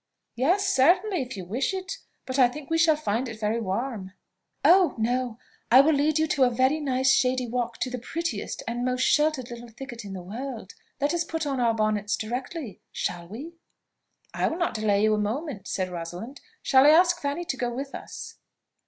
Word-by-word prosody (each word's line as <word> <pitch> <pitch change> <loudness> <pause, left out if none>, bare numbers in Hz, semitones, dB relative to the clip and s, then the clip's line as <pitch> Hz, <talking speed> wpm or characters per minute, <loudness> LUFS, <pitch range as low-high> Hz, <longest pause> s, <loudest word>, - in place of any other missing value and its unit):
"Yes, 350 +11 +2
certainly, 355 +7 +3
if 250 -4 -6
you 185 - -6
wish 250 - -1
it; 380 +1 -5 0.3
but 260 +1 -2
I 250 - +7
think 285 +4 -9
we 325 - +3
shall 320 -1 +5
find 250 -4 -2
it 220 -1 -8
very 220 +2 0
warm." 200 -1 -3 0.5
"Oh! 365 -1 +6
no. 240 +1 -1 0.3
I 250 - +8
will 310 +3 +3
lead 300 +2 +2
you 315 0 +2 0.2
a 250 - +5
very 260 +5 +2
nice 265 -2 +2
shady 255 0 +2
walk 240 -1 -2
to 255 - -1
the 250 - -4
prettiest 335 +7 -4
and 240 +1 -2
most 255 0 0
sheltered 295 -5 +2
little 240 0 -8
thicket 240 0 -9
in 200 -1 -7
the 185 -2 -6
world. 225 +1 -7 0.3
Let 285 +3 +1
us 340 -1 +1
put 325 -1 -3
on 275 -3 -1
our 230 -2 +2
bonnets 215 -1 0
directly; 250 - -5
shall 170 -1 -3
we?" 290 - -9 0.8
"I - - +1
will 325 - -2
not 350 0 0
delay 210 -2 +1
you 215 0 +4
a 210 - +1
moment," 225 - -3
said 185 -1 -2
Rosalind. 175 +10 -7 0.2
"Shall 265 +1 +6
I - - +9
ask 345 +2 +5
Fanny 285 +5 -2
to 270 - -2
go 245 -2 -2
with 270 +3 -5
us?" - - -8
255 Hz, 200 wpm, -26 LUFS, 220-300 Hz, 0.8 s, I